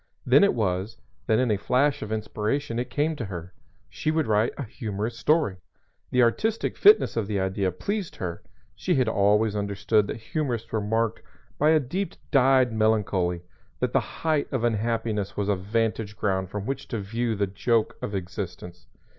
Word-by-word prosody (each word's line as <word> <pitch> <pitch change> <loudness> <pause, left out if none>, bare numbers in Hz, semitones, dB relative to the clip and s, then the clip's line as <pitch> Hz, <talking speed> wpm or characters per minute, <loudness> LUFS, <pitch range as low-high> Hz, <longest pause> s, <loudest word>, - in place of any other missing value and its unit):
Then - - +6
it 200 - +4
was, 100 -1 -1 0.3
that 110 - +3
in 125 -2 +2
a 105 - +2
flash 135 +6 +2
of 105 - -5
inspiration, 110 +4 -2
it 125 +1 -3
came 150 +5 0
to 120 - -3
her 90 -2 -7 0.3
she - - -3
would 155 -1 +1
write 110 +1 +2
a 140 - -3
humorous 110 -2 -4
story. 150 - +2 0.5
The 125 -1 +4
artistic 215 - 0
fitness 420 +1 +6
of 115 -4 -1
the 105 -2 -1
idea 95 0 0
pleased 200 - -3
her. 85 -2 -5 0.3
She - - 0
had 130 -3 +2
always 105 +1 +3
understood 100 +1 +1
that - - -4
humorists 120 -1 -3
were 110 - 0
marked 110 +2 0 0.4
by 150 - +4
a 160 0 +5
deep 180 +9 -3 0.2
dyed 130 -3 +4
melancholy, 100 -5 +1 0.4
that 125 -1 -1
the 135 - +5
height 150 +6 -2
of 130 -4 -1
unhappiness 110 -2 -1
was 100 0 -1
a 100 - +3
vantage 105 +2 -2
ground 95 -3 0
from 105 0 -5
which 135 +2 -4
to 115 - -3
view 115 +3 -2
the 100 0 +1
joke 110 +4 0
of 100 - -3
existence. 90 -3 -6
110 Hz, 180 wpm, -26 LUFS, 100-130 Hz, 0.5 s, Then